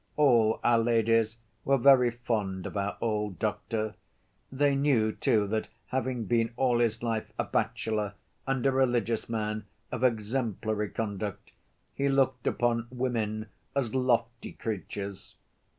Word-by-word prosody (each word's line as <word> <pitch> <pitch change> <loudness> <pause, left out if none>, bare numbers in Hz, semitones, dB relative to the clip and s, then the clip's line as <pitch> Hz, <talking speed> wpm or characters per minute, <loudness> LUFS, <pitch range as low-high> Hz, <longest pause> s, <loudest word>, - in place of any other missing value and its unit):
All 120 -7 +4
our 120 -1 +4
ladies 115 -1 +2 0.3
were 135 0 +3
very 130 -1 +6
fond 110 -6 -2
of - - -6
our 100 0 -1
old 105 -4 -1
doctor; 110 +4 -2 0.6
they 140 +1 +2
knew, 135 -6 +3
too, 105 0 +2
that 110 +1 -1 0.2
having 130 -3 -1
been 115 +2 +1
all 125 -3 +3
his 115 -1 +1
life 115 -2 -2
a - - +1
bachelor 105 -2 -1 0.3
and 135 -2 0
a 135 - +5
religious 120 -4 +1
man 110 -1 -2 0.3
of 120 - -3
exemplary 110 -3 0
conduct, 105 -2 -4 0.4
he 140 0 0
looked 130 -2 +1
upon 120 -1 +1
women 115 -4 -2 0.3
as 125 -5 0
lofty 120 -2 0
creatures. 100 -2 -5
115 Hz, 135 wpm, -29 LUFS, 110-125 Hz, 0.6 s, very